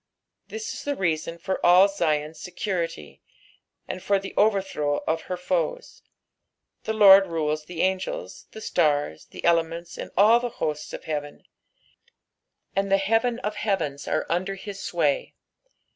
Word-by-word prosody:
Tliis 445 +1 -5
is - - -7
the 285 0 -1
reason 165 - -1
for 185 +3 -3
all 180 +3 +7
Zion's 155 -5 -1
secniity, 175 - -4 0.7
and 185 - -5
for 200 +2 +2
the 195 0 -7
overthrow 195 -8 +1
of 160 0 0
her 180 - -2
foes. 180 -3 -2 0.8
The 220 - -1
Lord 195 -2 +8
rules 155 -2 -2
the 170 0 -3
angels, 190 - -3
the 220 - -10
stars, 145 - 0
the - - -8
element?, 170 0 +2
snd 170 - -8
all 220 +4 +6
the 245 0 -3
hosts 150 -1 -3
of - - -7
heaven; 145 -2 -5 1.3
and 195 0 0
the 195 - +6
heaven 225 +4 +1
of 210 -2 -3
heavens 170 -10 -2
are 155 - 0
under 185 +3 -1
his 195 0 -8
sway. 155 -5 -1
180 Hz, 145 wpm, -25 LUFS, 160-200 Hz, 1.3 s, Lord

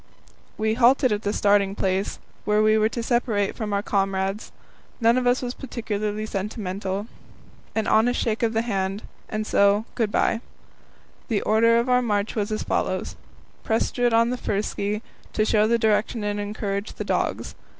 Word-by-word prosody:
We 220 0 +1
halted 255 +2 +4
at 210 0 0
the 205 - -1
starting 200 -1 +2
place, 190 0 -1 0.3
where 210 0 +2
we 215 0 +4
were 215 0 +3
to 235 0 -4
separate 230 -4 0
from 215 -3 -4
our 200 0 0
comrades. 195 0 -1 0.5
None 230 0 +4
of 255 -1 +1
us 245 +1 +2
was 245 0 -3
particularly 215 -5 -3
sentimental. 195 -1 -3 0.7
An 220 -1 0
honest 235 +4 +3
shake 225 -1 -1
of 230 -1 +1
the 225 +1 +1
hand, 195 -2 -2 0.3
and 215 0 -2
so 200 +1 +3
"Good 225 -4 0
bye." 225 - +1 0.9
The 220 -5 0
order 230 +2 +4
of 235 +2 +1
our 250 0 +4
march 210 -3 0
was 210 -1 -2
as 215 - -2
follows: - - -2 0.5
Prestrud 240 +2 +1 0.3
first - - -7
on 200 - 0
ski, 210 +1 -3 0.3
to 215 - +1
show 215 -1 +3
the 235 +1 +3
direction 220 0 +1
and 205 0 -1
encourage 205 0 -3
the - - -5
dogs. - - -1
215 Hz, 170 wpm, -24 LUFS, 205-230 Hz, 0.9 s, halted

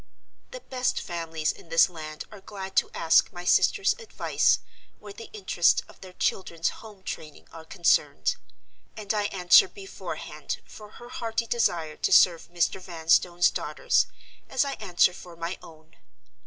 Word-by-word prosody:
The - - -9
best 255 - -1
families 165 -3 -2
in 165 - -16
this 165 0 +5
land 155 -3 -8
are 210 -2 -12
glad 195 -1 -8
to - - +3
ask 160 - +3
my 175 0 -9
sister's 395 - +3
advice 455 - +1 0.4
where 205 -1 -11
the 230 - -11
interests 190 -4 +2
of - - -18
their 185 -1 -11
children's 170 -3 -1
home 210 -4 -13
training 155 -4 -8
are 165 -1 -11
concerned; 170 +1 +1 0.6
and 210 -1 -2
I 210 -1 0
answer, 190 - +5
beforehand, 395 +5 -7
for 210 -1 -13
her 240 - -12
hearty 230 -1 -2
desire 170 -10 0
to - - -1
serve 170 -3 +5
Mr. 175 +2 0
Vanstone's 175 0 +2
daughters, - - 0 0.4
as 265 +1 +1
I 275 - -3
answer 180 -3 +3
for 175 -1 -12
my 170 +2 -5
own. 160 +1 -16
180 Hz, 155 wpm, -26 LUFS, 165-215 Hz, 0.6 s, this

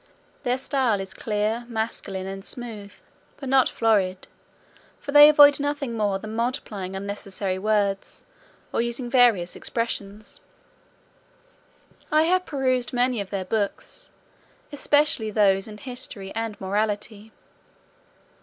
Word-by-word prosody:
Their 250 -1 0
style 260 -5 +1
is 190 0 -6
clear, 215 +3 -1
masculine, 220 -4 -4
and 195 0 -6
smooth, 215 -4 -7 0.5
but 275 - -7
not 265 -1 +4
florid; 195 -5 +1 0.7
for 285 - -6
they 295 +1 +10
avoid 290 -1 +7
nothing 285 -3 -2
more 205 -3 0
than 215 +2 -7
multiplying 220 -6 -3
unnecessary 195 -1 -4
words, 200 -1 -1 0.5
or - - +2
using 235 +1 -3
various 235 -9 +4
expressions. 215 -3 -3 1.7
I 310 +1 +5
have 365 +2 +1
perused 255 -4 0
many 245 -2 +1
of 195 - -7
their 195 -2 -3
books, 220 - -3 0.6
especially 290 -5 +2
those 200 -2 +3
in 210 -1 -9
history 235 -5 -7
and 225 -1 -4
morality. 210 +2 -2
220 Hz, 115 wpm, -24 LUFS, 200-255 Hz, 1.7 s, they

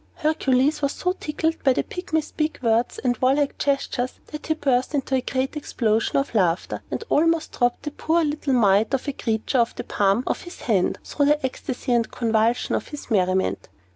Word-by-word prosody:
Hercules 295 -2 +1
was 280 -1 0
so 360 - -1
tickled 320 -1 -2
with 265 -2 +4
the - - +1
Pygmy's 320 -4 -3
big 310 0 -1
words 230 +1 +1
and 245 -2 0
warlike 275 +2 +1
gestures, 275 -3 -1
that 300 0 -7
he 315 - +1
burst 265 -1 0
into 275 -1 -2
a 260 - +3
great 260 +3 -2
explosion 225 -6 0
of 275 -2 -1
laughter, 180 -5 +1
and - - -3
almost 330 +1 +2
dropped 245 +2 0
the 295 - -4
poor 325 +3 +1
little 295 -2 -1
mite 215 +1 +4
of 270 - -5
a 285 - -1
creature 225 +1 -1
off 235 0 +1
the - - -5
palm 200 +4 +1
of - - -2
his 350 - -11
hand, 200 -7 +1
through 285 -1 0
the 295 -1 +2
ecstasy 255 0 -4
and 235 -1 +2
convulsion 230 +1 +1
of - - -1
his 295 -4 -9
merriment. 190 -2 +1
265 Hz, 195 wpm, -23 LUFS, 230-300 Hz, -, with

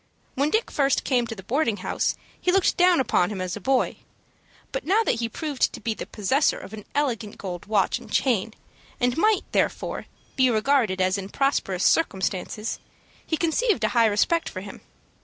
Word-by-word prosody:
When 280 +3 +1
Dick 440 +7 0
first 275 -2 +2
came 245 -3 +1
to 225 - -6
the 190 - -10
boarding 230 - 0
house - - -1 0.3
he 360 - +2
looked 385 -1 +3
down 360 -1 +5
upon 210 -8 +2
him 205 -3 -5
as 185 -1 -3
a 210 - -8
boy; 265 +4 +1 0.7
but - - -3
now 420 +5 +3
that 235 - 0
he 230 -1 -1
proved 295 +2 -1
to - - -7
be 230 - -2
the - - -7
possessor 260 +8 +1
of 200 - -10
an 210 -2 -8
elegant 235 -8 -1
gold 180 -2 -6
watch 205 -3 +1
and - - -14
chain, 225 -4 +1 0.4
and 245 0 +1
might, 420 +4 +3
therefore, - - -1 0.3
be 260 -1 +4
regarded 220 -4 +2
as 185 +2 +2
in 195 0 -7
prosperous 200 -9 0
circumstances, 210 - 0 0.4
he 320 - -1
conceived 340 - +1
a 215 - +3
high 235 -2 +4
respect 275 +11 +1
for 185 - -7
him. 195 0 -10
235 Hz, 190 wpm, -25 LUFS, 205-295 Hz, 0.7 s, down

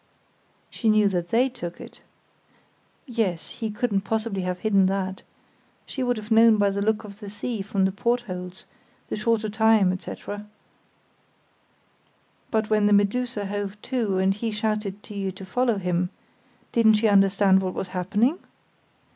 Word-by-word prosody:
"She 225 - 0
knew 215 -1 +5
that 175 -2 -2
they 240 +6 +3
took 175 -9 -7
it?" - - -12 1.0
"Yes. 225 - -2
He 225 -2 -5
couldn't 210 -1 0
possibly 220 -1 -2
have 180 0 -2
hidden 200 -3 +3
that. 190 0 -2 0.6
She 265 - -6
would 245 -2 +1
have 215 +1 -8
known 225 0 +6
by 200 -1 +3
the 200 +1 -2
look 215 +1 +1
of 205 -1 -11
the 205 -2 -8
sea 210 +2 -4
from 195 -1 0
the 190 - +1
portholes, 190 -5 -3 0.4
the - - -2
shorter 220 0 0
time, 215 -3 +3
etc." 205 +2 -7 2.0
"But 220 -1 0
when 210 -1 +4
the 205 - +4
Medusa 205 +2 +1
hove 205 0 -4
to 230 -7 -1
and 190 +1 +3
he 225 +3 -3
shouted 210 -2 -2
to - - -11
you 195 -1 -2
to 190 +1 -10
follow 235 +3 +1
him—didn't 180 +4 -1
she 215 +1 +2
understand 195 -1 +4
what 185 -1 -3
was 185 - -4
happening?" 205 - 0
205 Hz, 155 wpm, -25 LUFS, 195-225 Hz, 2.0 s, known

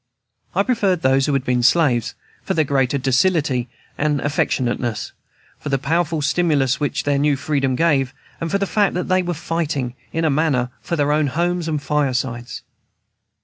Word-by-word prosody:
I 200 - +3
preferred 200 -8 +1
those 135 +1 +3
who 145 - +1
had 135 -2 +1
been 125 -1 +1
slaves, 125 -3 +2 0.3
for - - -2
their 155 -2 +2
greater 135 -1 +1
docility 130 -1 +1 0.3
and 150 -1 +1
affectionateness, 120 -5 -1 0.5
for 150 - -6
the 135 - +2
powerful 160 +2 0
stimulus 145 -5 +1
which 145 -2 -1
their 145 -1 +1
new 145 0 +2
freedom 135 -2 0
gave, 140 -4 +2 0.3
and 165 - -3
for 200 - +1
the 200 - 0
fact 205 -1 +1
that 180 - -2
they 185 0 +3
were 175 -1 -3
fighting, 155 -6 -2 0.2
in 165 0 -1
a 155 - +3
manner, 135 -4 +1
for 170 - -3
their 145 -2 +1
own 150 0 +2
homes 170 +4 -1
and 150 -3 -2
firesides. 130 -4 -2
145 Hz, 175 wpm, -20 LUFS, 130-165 Hz, 0.5 s, I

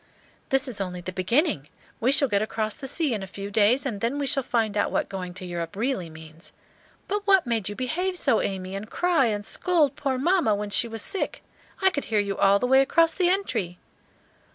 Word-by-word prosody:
"This 270 +1 +2
is 230 -6 -4
only 180 -2 -4
the 185 - -5
beginning; 185 - 0 0.3
we 245 +3 +2
shall 280 0 +3
get 205 -4 +1
across 215 0 -2
the 270 - -8
sea 295 -1 0
in 210 - -3
a 195 - -6
few 200 +2 -7
days, 220 +7 +3
and 210 -7 -3
then 235 +5 -1
we 285 - -1
shall 275 +1 +1
find 225 -4 -1
out 205 - +1
what - - 0
going 185 -2 -5
to 185 -1 -5
Europe 170 0 -5
really 215 -5 -2
means. 160 +1 -13 0.5
But 410 +1 -3
what 385 -4 +5
made 225 -5 -1
you 205 - -6
behave 355 - -2
so, 270 -9 +2
Amy, 190 -1 -3
and 200 +3 -6
cry 345 -8 +2
and 205 -2 -2
scold 315 -5 +1
poor 270 -3 -1
mamma 325 - +2
when 205 0 -4
she 235 - +2
was 225 -2 -5
sick? 390 - -2 0.4
I 380 - +5
could 285 - -3
hear 215 -2 +1
you 200 -1 -1
all 195 +1 +4
the 225 - -1
way 265 +2 +5
across 330 +4 +3
the 360 -2 +2
entry." 205 - -1
225 Hz, 225 wpm, -25 LUFS, 200-285 Hz, 0.5 s, what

